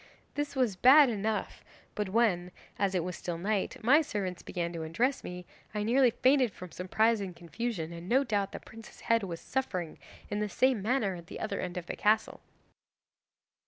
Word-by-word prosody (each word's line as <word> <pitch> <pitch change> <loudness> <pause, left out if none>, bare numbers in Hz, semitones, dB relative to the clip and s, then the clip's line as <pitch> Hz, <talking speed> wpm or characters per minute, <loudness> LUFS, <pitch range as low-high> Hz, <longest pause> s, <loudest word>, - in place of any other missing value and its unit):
This 290 0 -3
was 250 -7 +1
bad 265 +6 +7
enough, 215 0 -2 0.3
but 210 -2 -2
when 190 -5 +2 0.3
as 195 -1 +1
it 175 - +1
was 180 0 -4
still 170 -1 -4
night 205 +6 -1
my 280 +7 +6
servants 190 - -3
began 170 -1 -3
to 165 - -4
undress 230 - 0
me, 180 0 -7 0.3
I 210 - 0
nearly 250 +3 +4
fainted 255 0 +3
from 180 -2 -10
surprise 215 +4 +1
and 185 -3 -5
confusion, 170 +1 -4
and 170 +2 -8
no 265 +3 +4
doubt 205 -5 -1
the - - -6
prince's 225 0 -13
head 230 0 +2
was 175 -4 -5
suffering 185 -11 -3 0.3
in 205 - -2
the 210 0 -1
same 255 0 +2
manner 220 -2 +1
at 170 -1 -10
the - - -8
other 215 - -3
end 180 0 -4
of 175 - -4
the - - -5
castle! 215 +1 +1
205 Hz, 190 wpm, -30 LUFS, 180-240 Hz, 0.3 s, bad